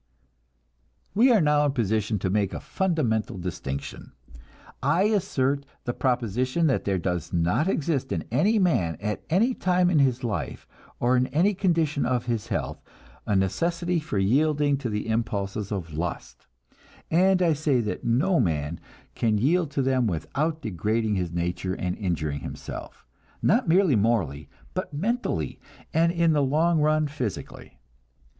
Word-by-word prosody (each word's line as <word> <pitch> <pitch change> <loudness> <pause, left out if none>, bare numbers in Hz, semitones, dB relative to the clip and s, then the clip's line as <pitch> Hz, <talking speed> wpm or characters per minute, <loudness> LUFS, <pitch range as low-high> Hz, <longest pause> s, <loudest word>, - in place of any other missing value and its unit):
We 245 +6 +5
are 220 -5 +5
now 150 -1 +3
in 145 -2 +1
position 110 -2 0
to 95 -1 -2
make 100 -1 0
a - - -4
fundamental 125 - -1
distinction. 85 -6 -6 0.7
I 155 +8 +2
assert 145 -10 +1 0.2
the 120 - -2
proposition 125 - 0
that 135 -5 +1
there 100 -1 +1
does 90 -2 -2
not 90 - +1
exist, 145 -7 -1
in - - -1
any 220 +3 +3
man, 125 - +1
at 105 +2 -3
any 215 +10 +3
time 180 -3 +2
of 160 - +4
his 130 -2 +2
life, 110 -4 -3 0.3
or 125 +1 +3
in 125 0 +2
any 180 +10 +2
condition 165 -6 +1
of 125 -1 0
his 115 -4 -2
health, - - -3 0.5
a 105 - +1
necessity 170 - 0
for 155 -9 -4
yielding 145 +8 +2
to 130 -3 -4
the 105 0 -3
impulses 105 -2 -2
of 85 -6 -4
lust; 85 +2 -5 0.6
and 185 +3 +4
I 165 -2 +4
say 145 -3 +1
that 105 - -4
no 150 +11 +2
man 80 -1 -1 0.3
can 110 -2 +1
yield 160 - +2
to 140 -1 -1
them 130 -2 +2
without 145 - -2
degrading 110 +3 -1
his 90 -4 -1
nature 90 +2 -2
and 90 -1 -2
injuring 80 -7 -2
himself, - - -8 0.4
not 230 +2 +3
merely 175 -3 +4
morally, 95 - 0 0.2
but - - -3
mentally, 150 - -2 0.3
and 165 +1 +3
in 170 -2 +2
the 150 - +2
long 155 +5 +2
run 155 0 +2
physically. 120 - -6
130 Hz, 150 wpm, -26 LUFS, 100-160 Hz, 0.7 s, We